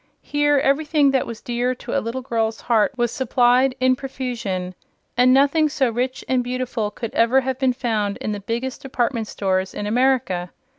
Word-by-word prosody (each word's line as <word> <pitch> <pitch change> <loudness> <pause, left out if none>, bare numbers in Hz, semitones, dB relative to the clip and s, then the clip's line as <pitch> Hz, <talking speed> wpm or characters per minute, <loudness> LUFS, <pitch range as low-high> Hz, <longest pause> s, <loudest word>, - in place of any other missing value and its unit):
Here 290 0 +2
everything 285 +1 +2
that 265 -1 0
was 230 -2 -7
dear 245 +1 -1
to - - -6
a - - +2
little 240 +3 -4
girl's 225 -2 -1
heart 225 -3 +2
was 240 -1 +1
supplied 255 +1 +2
in 255 0 +3
profusion, 235 -9 -4 0.4
and 250 +1 +5
nothing 285 +4 +4
so 265 -4 +1
rich 250 +3 -3
and 255 -1 +1
beautiful 250 -3 -2
could 225 +2 -7
ever 235 +4 +4
have 260 0 -3
been 260 -2 +2
found 220 -5 -1
in 215 - -4
the 205 - -3
biggest 235 +6 -4
department 240 -4 -1
stores 190 -2 -1
in 205 - -4
America. 230 -6 +1
250 Hz, 180 wpm, -22 LUFS, 225-265 Hz, 0.4 s, and